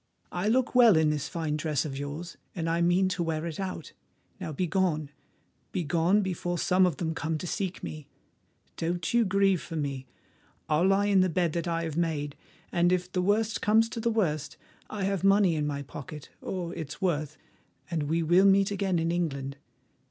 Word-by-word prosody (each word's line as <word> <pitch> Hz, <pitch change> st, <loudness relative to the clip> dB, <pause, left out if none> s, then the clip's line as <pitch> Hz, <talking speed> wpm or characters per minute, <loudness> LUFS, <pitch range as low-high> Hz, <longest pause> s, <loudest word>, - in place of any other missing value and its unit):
I 180 Hz, +3 st, -2 dB
look 250 Hz, +3 st, +2 dB
well 235 Hz, -7 st, +7 dB
in 155 Hz, -1 st, +3 dB
this 150 Hz, -2 st, -2 dB
fine 160 Hz, -3 st, -2 dB
dress 155 Hz, -3 st, -1 dB
of 140 Hz, -3 st, -4 dB
yours, 145 Hz, +5 st, -6 dB, 0.2 s
and 165 Hz, -3 st, -2 dB
I 165 Hz, +1 st, +1 dB
mean 175 Hz, +2 st, +3 dB
to 185 Hz, -1 st, -2 dB
wear 160 Hz, -1 st, -1 dB
it 165 Hz, 0 st, -5 dB
out. 185 Hz, -4 st, -5 dB, 0.5 s
Now -, -, -4 dB
begone—begone, 170 Hz, +2 st, -1 dB
before 175 Hz, -1 st, -2 dB
some 185 Hz, +2 st, +3 dB
of 165 Hz, -6 st, -2 dB
them 160 Hz, 0 st, -2 dB
come 160 Hz, 0 st, -2 dB
to 165 Hz, -, -6 dB
seek 190 Hz, +1 st, -3 dB
me. 155 Hz, -2 st, -7 dB, 0.7 s
Don't 170 Hz, +2 st, -2 dB
you 235 Hz, 0 st, +5 dB
grieve 195 Hz, -2 st, +2 dB
for 165 Hz, -, -7 dB
me; 140 Hz, -4 st, -3 dB, 0.6 s
I'll 155 Hz, +5 st, +3 dB
lie 195 Hz, +1 st, +3 dB
in 200 Hz, -2 st, +4 dB
the 185 Hz, -, +3 dB
bed 170 Hz, -1 st, 0 dB
that 170 Hz, 0 st, -2 dB
I 165 Hz, 0 st, -1 dB
have 160 Hz, -2 st, -4 dB
made, 150 Hz, -4 st, -1 dB, 0.4 s
and 175 Hz, 0 st, +3 dB
if 180 Hz, 0 st, 0 dB
the 180 Hz, -, 0 dB
worst 210 Hz, +3 st, +1 dB
comes 220 Hz, +2 st, +4 dB
to 230 Hz, -, -5 dB
the 235 Hz, +1 st, +1 dB
worst, 160 Hz, -10 st, -1 dB, 0.3 s
I 205 Hz, -2 st, -4 dB
have 195 Hz, -1 st, -1 dB
money 195 Hz, -2 st, +5 dB
in 150 Hz, -2 st, -1 dB
my 140 Hz, -1 st, -3 dB
pocket—or 155 Hz, +6 st, -7 dB
its 160 Hz, -4 st, -6 dB
worth—and 165 Hz, -1 st, -4 dB
we 160 Hz, +3 st, 0 dB
will 175 Hz, +4 st, +5 dB
meet 195 Hz, 0 st, +4 dB
again 195 Hz, -3 st, 0 dB
in 165 Hz, 0 st, 0 dB
England. 140 Hz, -6 st, -2 dB
170 Hz, 185 wpm, -28 LUFS, 155-190 Hz, 0.7 s, well